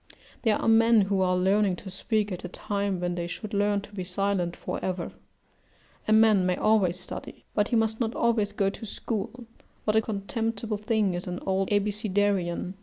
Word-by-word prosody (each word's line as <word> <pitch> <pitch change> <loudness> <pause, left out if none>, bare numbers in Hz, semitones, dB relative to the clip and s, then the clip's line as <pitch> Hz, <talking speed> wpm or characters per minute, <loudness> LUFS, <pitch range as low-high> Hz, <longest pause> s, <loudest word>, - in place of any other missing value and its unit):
There 220 -3 +3
are - - -2
men 225 0 +6
who 195 -1 +1
are 180 -1 +2
learning 195 +1 +3
to 190 +1 -9
speak 210 +1 -1
at 180 - -5
a - - -3
time 200 +1 -2
when 175 0 -1
they 170 -1 -3
should 200 +5 -6
learn 205 0 +2
to 205 +1 -14
be 190 -3 -4
silent 180 -1 -1
for - - -5
ever. 180 -2 -2 1.0
A - - +1
man 215 -3 +6
may 180 0 +2
always 190 -5 +2
study, 180 - -8
but 210 0 +2
he 245 - 0
must 225 -1 +1
not 230 -2 -1
always 225 -3 +2
go 195 -1 +1
to 225 - -8
school 230 +4 -4 0.4
what 215 - +2
a 220 - +5
contemptible 220 +1 -2
thing 210 -2 +1
is 175 +2 -4
an 180 0 -3
old 190 0 0
Abecedarian! 205 -3 0
205 Hz, 190 wpm, -27 LUFS, 185-220 Hz, 1.0 s, men